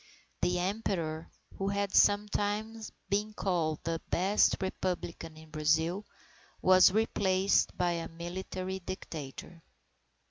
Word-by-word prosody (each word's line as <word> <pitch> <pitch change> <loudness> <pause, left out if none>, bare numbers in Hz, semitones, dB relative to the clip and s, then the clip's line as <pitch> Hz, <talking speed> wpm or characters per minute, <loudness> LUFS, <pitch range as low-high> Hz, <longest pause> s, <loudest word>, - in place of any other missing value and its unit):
The 180 0 +2
Emperor, 175 -4 -2 0.3
who 195 - -1
had 200 0 -1
sometimes 210 +2 +2 0.2
been 210 +2 0
called 165 -7 -1
the 165 0 -2
best 195 +4 +3
Republican 180 -4 -4
in 160 0 -14
Brazil, 160 +6 +1 0.5
was 185 0 +7
replaced 195 -2 +2
by 175 -1 +2
a 170 -1 -3
military 185 +2 -5
dictator. 165 -2 -7
185 Hz, 105 wpm, -31 LUFS, 165-200 Hz, 0.5 s, was